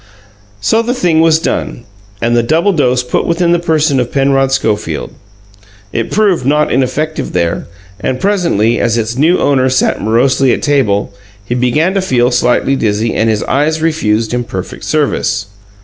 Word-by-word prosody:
So 225 - +2
the 240 +2 -2
thing 175 -9 +1
was 165 -1 +4
done, 140 -6 -3 0.4
and 120 +1 +1
the 120 - +3
double 165 - +1
dose 125 -5 +1
put 125 - -2
within 170 0 +1
the 175 - +2
person 155 -4 +1
of 125 -1 -2
Penrod 135 -1 +1
Schofield. 110 -5 -2 0.8
It 115 - -2
proved 200 -9 +1
not 150 +3 +1
ineffective 150 +5 -1
there, 85 -2 -1 0.3
and 130 -1 -2
presently, 170 - +1
as 115 -1 +1
its 115 +1 -2
new 160 +7 +3
owner 130 -2 +2
sat 130 0 0
morosely 125 +4 +2
at - - -3
table, 115 -10 0 0.3
he 120 - -3
began 125 +9 +1
to 195 - 0
feel 125 -8 +1
slightly 125 +2 +1
dizzy 110 -1 -1
and 115 - +1
his 110 -1 0
eyes 150 +3 0
refused 115 -9 0
him 125 0 -1
perfect 95 -5 -7
service. 145 -8 0
135 Hz, 165 wpm, -13 LUFS, 115-160 Hz, 0.8 s, was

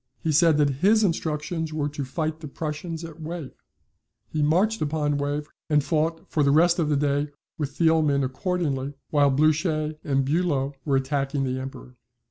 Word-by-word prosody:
He 160 - -1
said 160 0 +5
that 145 -3 +2
his 215 +2 +5
instructions 160 -2 -1
were 155 -2 -1
to 145 -1 -4
fight 155 +4 -3
the 155 - -7
Prussians 160 +3 -5
at 165 0 -10
Wavre. 160 -2 -5 0.8
He 155 - -1
marched 185 +9 +2
upon 150 -1 0
Wavre 145 +1 -2 0.2
and 150 -2 +3
fought 160 +1 -1
for 155 - 0
the 140 - +4
rest 170 +4 +4
of 155 -3 +1
the 145 - +2
day 145 +1 +1 0.3
with 145 -2 -3
Thielman 160 -4 +3
accordingly, 145 -2 -2 0.2
while 145 -2 +4
Blucher 155 +2 +2
and 135 -2 +1
Bulow 145 -3 0
were 140 -3 +2
attacking 135 +1 0
the 130 0 -1
Emperor. 130 -1 -9
150 Hz, 170 wpm, -25 LUFS, 140-160 Hz, 0.8 s, said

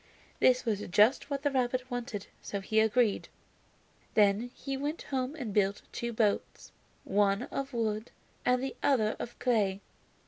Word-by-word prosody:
This 255 0 +4
was 215 -4 0
just 210 +11 +4
what 280 -1 -3
the 290 - +2
rabbit 255 0 0
wanted, 240 -5 -4 0.2
so 200 - -4
he 215 +3 +1
agreed. 220 0 +2 0.9
Then 210 +3 +4
he 275 -1 -4
went 290 +4 -3
home 265 +1 -2
and 245 -9 -5
built 200 -1 +1
two 235 0 -3
boats, 215 -3 -1 0.3
one 200 +2 +2
of 275 0 -3
wood 220 -2 -1 0.3
and 250 +1 +2
the 270 - -3
other 220 -6 +2
of 240 - -6
clay. 210 -6 +1
235 Hz, 150 wpm, -30 LUFS, 210-255 Hz, 0.9 s, This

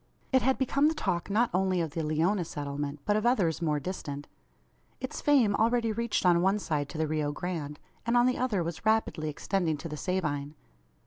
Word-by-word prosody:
It 260 -1 +4
had 265 +2 +2
become 275 +2 +2
the 320 - +1
talk 175 - -1
not 225 +4 +2
only 185 0 +2
of 165 -3 -1
the 165 - -3
Leona 165 +5 +1
settlement, 145 -1 -4
but 205 - +2
of 215 - +1
others 190 -10 +2
more 150 -3 +1
distant. 145 -4 -5 0.7
Its - - -5
fame 265 -9 +4
already 230 +1 +2
reached 230 -2 -1
on 175 -1 +5
one 190 +3 +3
side 150 -7 -2
to 165 - -7
the 160 - +1
Rio 155 -1 -1
Grande, 150 -3 -4 0.2
and 235 +2 +2
on 240 - +5
the 255 0 +1
other 225 -8 +1
was 165 -1 -5
rapidly 220 -8 +1
extending 165 +1 -1
to 145 - -6
the 150 -1 -6
Sabine. 155 -5 -2
180 Hz, 200 wpm, -29 LUFS, 155-220 Hz, 0.7 s, on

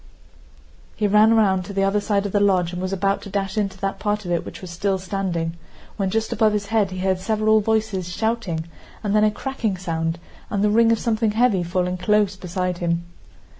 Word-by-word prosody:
He 215 - -1
ran 210 +2 +5
round 190 -4 +3
to 200 - -7
the 195 0 +1
other 195 +1 +2
side 205 -1 0
of 200 - -2
the 205 - +2
lodge 185 -3 +2
and 180 - -4
was 185 0 -2
about 195 +1 0
to - - -9
dash 195 -1 -2
into 200 -3 -1
that 195 0 -3
part 210 0 -1
of 175 - -3
it 170 -1 0
which - - -9
was 185 -2 -9
still 190 +3 0
standing, 185 -3 -2 0.4
when 195 -2 -1
just 220 +3 -1
above 215 -1 +3
his 205 -1 -1
head 210 -3 +3
he 185 - -7
heard 185 0 0
several 215 +2 +2
voices 215 -4 -1
shouting 205 -6 -2 0.4
and 205 0 0
then 210 - +4
a 215 - +5
cracking 220 -3 -3
sound 165 -2 -2 0.3
and 200 -1 0
the 210 - +3
ring 230 +1 +5
of 230 - +3
something 225 -1 0
heavy 225 -4 +3
falling 180 +1 -1
close 205 +1 +2
beside 180 -1 -3
him. 170 -1 0
195 Hz, 215 wpm, -22 LUFS, 185-215 Hz, 0.4 s, ran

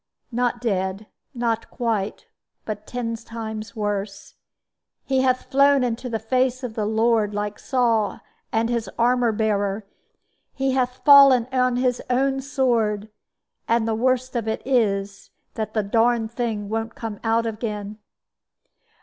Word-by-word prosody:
"Not 245 0 0
dead 195 -2 -1 0.3
not 230 -2 -1
quite; 220 -4 -2 0.4
but 215 -1 -6
ten 240 -2 -3
times 220 -2 -7
worse. 205 -1 -3 0.7
He 265 -1 +2
hath 255 -1 0
flown 280 0 +5
into 245 +1 -2
the 225 - -1
face 255 +3 0
of 245 -3 -4
the 215 -2 -2
Lord, 220 -1 +2
like 205 0 -3
Saul 235 -5 +1 0.3
and 225 0 +1
his 230 -4 -2
armor 240 0 +3
bearer; 205 -1 -1 0.7
he 270 0 0
hath 255 -1 -1
fallen 275 -4 +8
on 255 -1 +2
his 250 0 0
own 270 +2 +1
sword; 230 -6 0 0.6
and 230 -1 +2
the 225 - +1
worst 255 +2 0
of 230 -2 -1
it 220 - -2
is 200 -6 0 0.2
that 220 0 -4
the 215 - +2
darned 225 +2 +2
thing 225 -4 -3
won't 225 +1 -3
come 220 -3 -6
out 230 0 +2
again." 215 -2 -4
230 Hz, 140 wpm, -23 LUFS, 215-250 Hz, 0.7 s, fallen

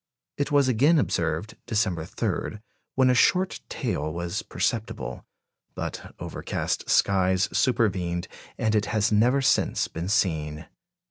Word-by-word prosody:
It 145 - -1
was 140 -2 +4
again 135 +7 +4
observed 145 - -1
December 95 -7 0
3, 105 - -3 0.4
when 130 -1 +4
a - - +4
short 185 +9 +3
tail 75 +2 -2
was 85 +1 -3
perceptible; 105 - -3 0.5
but - - -6
overcast - - -3
skies 95 0 +3
supervened, 90 -8 +1 0.3
and 110 -1 +1
it 105 -1 +1
has 110 0 +1
never 125 +6 +3
since - - +2
been 85 +3 -5
seen. 80 -7 0
105 Hz, 125 wpm, -26 LUFS, 85-125 Hz, 0.5 s, was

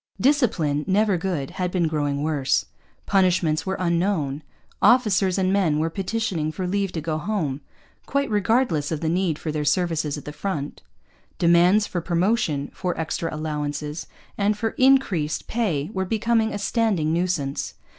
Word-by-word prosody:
Discipline, 190 - +2
never 205 +1 +3
good, 165 -6 -2
had 180 -1 -2
been 175 -2 +1
growing 145 -2 -1
worse. 150 -4 +1 0.4
Punishments 180 -5 +2
were 190 - -1
unknown. 170 -5 0 0.4
Officers 205 -7 +4
and 190 0 +1
men 175 -7 +2
were 160 +2 0
petitioning 190 -5 -2
for 180 +4 -4
leave 195 +1 -1
to 160 - -3
go 155 0 -2
home, 155 -7 -2 0.5
quite 280 0 0
regardless 205 - +1
of 155 - -2
the 160 - -1
need 175 -2 0
for 155 - -4
their 150 0 -2
services 155 -1 0
at 145 - -9
the 150 - -6
front. 150 -3 -4 0.6
Demands 175 +5 +4
for 175 - -3
promotion, 170 -4 0
for 180 -3 -3
extra 165 +1 -2
allowances, 150 0 -4 0.3
and 205 +1 +2
for 225 +1 0
increased 220 - +2
pay 185 -9 -1
were 190 - -1
becoming 225 +3 +1
a - - -3
standing 200 -7 0
nuisance. 170 -6 -1
175 Hz, 155 wpm, -23 LUFS, 155-200 Hz, 0.6 s, Officers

